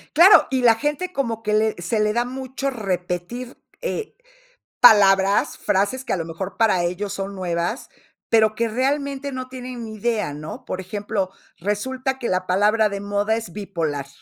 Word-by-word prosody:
Claro, 365 +6 +8
y 260 -1 +1
la 230 -2 +6
gente 295 +8 -2
como 230 -7 -2
que 210 -1 -1
le 215 0 +2
se 215 +6 -1
le 210 0 +2
da 240 +1 +1
mucho 260 +2 -4
repetir, 195 +2 -4 0.2
eh, 450 -3 -4 0.7
palabras, 200 -3 +6
frases 205 +6 0
que - - -5
a - - +1
lo 165 - -3
mejor 185 +4 -6
para 210 -6 +3
ellos 185 +3 -2
son 195 0 -5
nuevas, 175 - -2 0.4
pero, 220 -1 +4
que 230 +2 0
realmente 275 +3 -1
no 255 -1 -5
tienen 250 -2 -7
ni 220 - -8
idea, 215 -7 -1
¿no? 150 +2 -8
Por 185 - -4
ejemplo, 200 0 -3 0.3
resulta 260 +7 -2
que 240 - -2
la 185 0 0
palabra 210 +4 +3
de 200 0 -4
moda 205 +2 0
es 225 -7 -7
bipolar. 165 -9 -3
215 Hz, 175 wpm, -22 LUFS, 195-255 Hz, 0.7 s, Claro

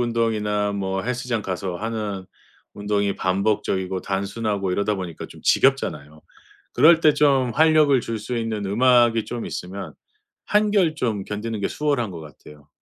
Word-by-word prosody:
운동이나 110 -3 0
뭐 95 -1 -2
헬스장 125 -1 -2
가서 95 -1 -4
하는 105 -3 -4 0.5
운동이 100 -1 -1
반복적이고 95 -1 -1
단순하고 100 0 -2
이러다 100 +2 0
보니까 90 -4 -6
좀 - - -14
지겹잖아요. 80 - +1 0.5
그럴 160 +6 +6
때 155 -2 +5
좀 140 -4 +3
활력을 155 -3 +4
줄 115 0 -4
수 120 +3 -4
있는 110 -3 -3
음악이 120 +1 +3
좀 120 -1 -5
있으면 90 -4 -6 0.5
한결 205 -6 +2
좀 110 -9 -2
견디는 105 +1 -4
게 - - -1
수월한 140 -8 -1
것 85 - -8
같아요. 75 -1 -15
105 Hz, 320 characters per minute, -22 LUFS, 95-125 Hz, 0.5 s, 그럴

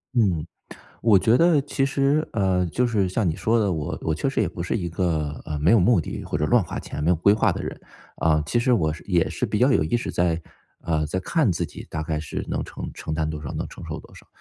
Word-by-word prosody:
嗯， 90 -9 +2 0.6
我 105 -4 +5
觉 115 +6 +3
得 170 -3 +5
其 135 -1 0
实， 140 +3 +1
呃， 95 -3 +2
就 125 +9 0
是 105 -6 +1
像 100 +2 0
你 80 - +1
说 115 +1 +1
的， 100 -3 +1
我 80 -3 -3
我 80 - 0
确 135 - -1
实 135 - 0
也 95 - 0
不 85 0 -6
是 90 - -1
一 90 -6 -3
个， 80 -5 -1
呃， 75 -2 -3
没 75 +4 +3
有 115 -2 +6
目 115 +3 +4
的 80 - -4
或 - - -3
者 75 - 0
乱 120 +6 +4
花 85 - -6
钱 75 - -6
没 80 - +1
有 90 - +4
规 95 +5 +4
划 105 - +3
的 - - -3
人。 - - -6 0.4
啊， 75 -1 +2
其 120 - 0
实 125 +1 +3
我 80 -7 +1
是 80 - -10
也 90 -4 +2
是 - - -2
比 105 - -1
较 130 +3 +4
有 - - +3
意 80 +10 +1
识 - - -4
在， 85 -2 +1 0.4
呃， 80 -2 0
在 95 +5 -2
看 150 - +1
自 85 - -1
己 - - -9
大 80 0 -3
概 75 -1 -2
是 75 - -5
能 - - -2
承 - - -7
承 80 - -5
担 80 0 -1
多 75 -1 -5
少， 70 - -5
能 - - -3
承 - - -11
受 - - -5
多 - - -17
少。 - - -15
90 Hz, 290 characters per minute, -24 LUFS, 80-115 Hz, 0.6 s, 有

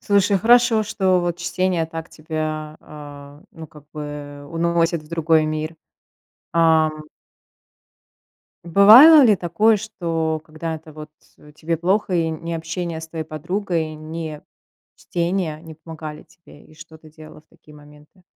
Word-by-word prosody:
Слушай, 200 0 +2
хорошо, 235 +1 +4
что, 190 -3 +1
вот, 175 0 -3
чтение 175 -1 -1
так 165 0 -8
тебя, 155 -1 -5
а, 145 0 -12
ну, 160 -1 -10
как 150 -1 -17
бы 145 -1 -8
уносит 170 0 0
в 150 - -19
другой 165 -1 +2
мир. 155 +1 -4 0.8
Ам. 160 -2 +2 1.6
Бывало 220 - +8
ли 215 -4 +5
такое, 210 +6 +2
что 165 -6 -3
когда-то 160 0 -7
вот 155 0 -11 0.4
тебе 165 +2 -3
плохо 185 +3 0
и 165 -2 +1
ни 165 +1 -6
общение 165 0 -4
с 160 - -10
твоей 160 -1 -5
подругой, 165 +1 -3
ни 155 0 -7 0.6
чтение 170 -2 -3
не 160 -1 -11
помогали 155 -1 -9
тебе, 160 -2 -19
и 155 - -20
что 160 +1 -14
ты 155 0 -17
делала 155 0 -14
в - - -42
такие 150 - -20
моменты? 150 +4 -19
160 Hz, 135 wpm, -21 LUFS, 155-175 Hz, 1.6 s, Бывало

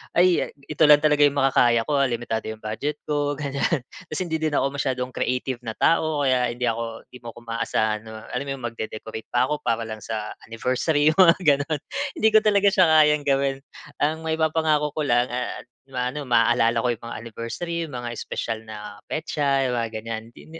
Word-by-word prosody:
"Ay, 180 0 +4
ito 150 +2 0
lang 150 0 +7
talaga 150 -1 +3
'yung 140 - -3
makakaya 120 -4 +3
ko 145 +3 0
ha. 140 - +3
Limitado 120 -2 -3
'yong 110 0 -7
budget 110 +8 -3
ko," 145 -1 -1
ganyan. 140 0 -1 0.2
Kasi 155 +4 -3
hindi 160 -2 -2
din 155 -2 -1
ako 140 - +1
masyadong 130 -2 -2
creative 125 0 -2
na 110 - -3
tao, 155 -3 +2
kaya 125 -2 +2
hindi 120 +1 -5
ako 115 -1 -2
'di 125 - -12
mo 120 -2 -10
ko 120 - -13
maaasahan 115 -2 -1
na, 110 0 -9
alam 125 +3 -3
mo - - -3
'yun, 130 - -12
magde-decorate 110 -1 -6
pa 120 - +2
ako 150 - -1
para 115 0 -1
lang 110 -1 -6
sa 110 -1 -5 0.2
anniversary, 145 +6 +1
'yung 165 - -5
mga 170 -3 +8
gano'n. 145 0 +2 0.4
Hindi 220 - +3
ko 215 - +7
talaga 205 -2 +3
siya 185 -3 +5
kayang 150 -2 +4
gawin. 135 -1 +1 0.4
Ang 160 +2 0
maipapangako 160 -2 +1
ko 155 - -1
lang 120 -3 +2
ah, 125 0 -4 0.3
ma-ano, 125 +3 -3
maaalala 115 -1 +3
ko - - +3
'yung 115 - -11
mga 115 -1 -6
anniversary, 115 +9 -5
'yung 150 - -11
mga 120 0 -5
espesyal 115 -1 -4
na 105 -2 -9
petsa, 140 -3 0
yung 125 - -1
mga 115 -1 -2
ganyan. 115 0 -4
Hindi 160 +6 -13
135 Hz, 200 wpm, -24 LUFS, 115-150 Hz, 0.4 s, mga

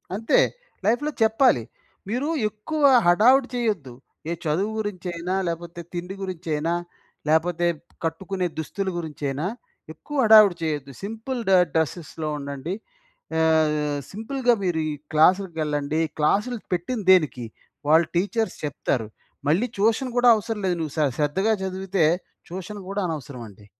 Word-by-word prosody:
అంతే. 225 - +3 0.5
లైఫ్‌లో 245 +8 +1
చెప్పాలి. 220 - +4 0.5
మీరు 250 +6 -1 0.2
ఎక్కువ 260 +9 -5 0.2
హడావిడి 245 +9 +5
చేయొద్దు. 205 - -1 0.4
ఏ - - -1
చదువు 180 +8 0
గురించైనా, 180 -4 -3
లేపోతే 170 +1 -5
తిండి 180 +2 -5
గురించైనా, 165 -3 -2 0.6
లేపోతే 170 +2 +2 0.4
కట్టుకునే 180 +3 -2
దుస్తుల 190 +5 -3
గురించైనా, 150 -2 -3 0.5
ఎక్కువ 295 - -9
హడావిడి 215 -4 +8
చేయొద్దు. 145 -3 -2
సింపుల్ 225 +5 -4
డ - - +5 0.2
డ్రెస్సెస్‌లో 160 0 -2
ఉండండి. 140 +4 -5 0.7
ఆహ్, 160 -1 +4 0.4
సింపుల్‌గా 245 +4 +1
మీరు 175 -3 0
ఈ - - -3 0.2
క్లాసులకెళ్ళండి 155 -3 +2 0.2
క్లాసులు 210 +10 +1
పెట్టింది 200 +5 -2
దేనికి? 150 -9 +3 0.4
వాళ్ళు 160 +1 +5
టీచర్స్ 220 +5 0
చెప్తారు. 130 -5 -2 0.4
మళ్ళీ 195 +11 +2
ట్యూషన్ 225 +5 +1
కూడా 245 0 +6
అవసరం 215 0 -3
లేదు. 175 -1 0
నువ్వు 155 -3 -4
శ - - +1 0.2
శ్రద్ధగా 190 +9 +2
చదివితే 190 -2 0 0.4
ట్యూషన్ 190 +4 -7
కూడా 200 +1 -2
అనవసరం 145 -6 -6
అండి. 100 +1 -17
180 Hz, 120 wpm, -24 LUFS, 155-215 Hz, 0.7 s, హడావిడి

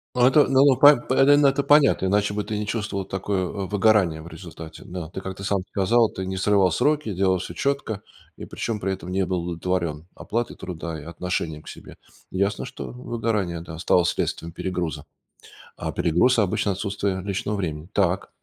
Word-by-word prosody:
Ну 125 0 +4
это, 145 +3 +6
ну, 135 +1 +5
во 140 -2 +6
по 145 +3 +8
п 130 +2 +1
ну, 145 -1 +5
это 135 +1 +1
понятно, 145 -10 +4
иначе 100 +1 +1
бы 105 0 -2
ты 105 0 -4
не 105 - -4
чувствовал 105 -3 -3
такое 95 0 -2
выгорание 100 -3 +1
в 80 - -11
результате. 80 -1 -10
Да, 90 -2 -6
ты, 95 - -7
как 95 0 -6
ты 100 - -7
сам 100 -1 +1
сказал, 110 +4 +3
ты 95 - -6
не 95 0 -4
срывал 95 0 +3
сроки, 145 - +1
делал 95 0 +2
всё - - -6
четко, 140 -7 -2 0.3
и - - -10
причем 110 -3 -4
при 95 - -1
этом 95 -2 -6
не 95 +1 0
был 90 -1 -1
удовлетворен 85 -2 -2
оплатой 115 +2 -3
труда 85 -2 -6
и 75 - -11
отношением 85 -2 -3
к - - -12
себе. - - -11 0.3
Ясно, 100 +4 -1
что 130 +1 -7
выгорание, 110 -8 -2
да, 80 -1 -9
стало 90 +1 +3
следствием 85 -1 -2
перегруза. 85 -4 -4 0.7
А - - -4
перегруз 90 +11 +3
обычно 100 0 +1
отсутствие 100 -1 -2
личного 100 +1 -2
времени. 80 -5 -4
Так. 95 -1 +1
95 Hz, 190 wpm, -24 LUFS, 90-110 Hz, 0.7 s, по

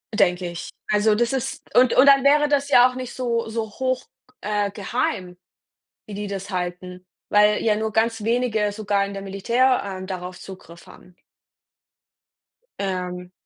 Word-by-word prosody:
Denke 180 -3 +2
ich. 175 +1 -7 0.2
Also 210 0 +3
das 235 +3 0
ist 265 -2 -3
und 250 0 +5
und 260 - +7
dann 275 -1 +6
wäre 295 +1 +4
das 285 -1 0
ja 245 +1 +7
auch - - -9
nicht 255 -1 -6
so 235 -3 -2
so 220 -1 -3
hoch, 255 +2 -2 0.2
g 255 - -28
äh, 205 -1 0
geheim, 185 -3 -3 0.7
wie 210 - -8
die 205 +1 -4
das 200 0 -6
halten, 180 0 -5 0.2
weil 210 0 +4
ja 215 -2 +2
nur 220 0 -2
ganz 225 0 0
wenige 225 -3 0
sogar 205 -1 0
in 200 - -7
der 195 - -6
Militär, 235 +7 +1
ähm, 190 -1 -6
darauf 180 -1 -6
Zugriff 170 -3 -12
haben. 180 - -17 1.7
Ähm 180 -2 -4
210 Hz, 165 wpm, -22 LUFS, 190-240 Hz, 1.7 s, und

